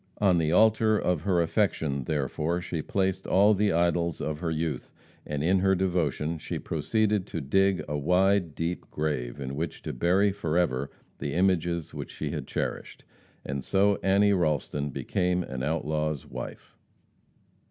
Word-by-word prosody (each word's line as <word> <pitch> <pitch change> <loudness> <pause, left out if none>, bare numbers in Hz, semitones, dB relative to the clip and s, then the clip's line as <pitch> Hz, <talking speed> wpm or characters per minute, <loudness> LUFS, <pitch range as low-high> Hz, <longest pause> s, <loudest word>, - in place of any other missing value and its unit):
On 95 -4 +3
the 80 -1 +1
altar 110 +2 +4
of 90 -6 0
her 90 -1 +2
affection, 80 - 0
therefore, 75 +3 -1
she 90 -3 -4
placed 95 +2 -1
all 100 +3 +5
the 105 0 +2
idols 85 -1 +1
of 75 0 -3
her 85 -1 -2
youth; 80 -4 -3 0.4
and 75 -1 -2
in 95 +3 +3
her 95 +1 +3
devotion 85 -4 -1
she - - -4
proceeded 105 -3 0
to - - -4
dig 95 +7 +2
a 75 - -3
wide, 90 +2 +2
deep 85 +2 -3
grave 75 -4 -3
in 70 0 -4
which 80 +2 -4
to - - -4
bury 95 +9 +3
forever 80 -7 0 0.3
the 70 - -3
images 85 -2 +1
which - - -6
she - - -4
had - - -5
cherished. - - -4 0.4
And 70 -1 -3
so 100 +4 +2
Annie 100 +1 +4
Ralston 75 -4 0
became 90 +6 -1
an 65 -5 -6
outlaw's 75 0 -1
wife. - - -8
85 Hz, 155 wpm, -27 LUFS, 75-95 Hz, 0.4 s, all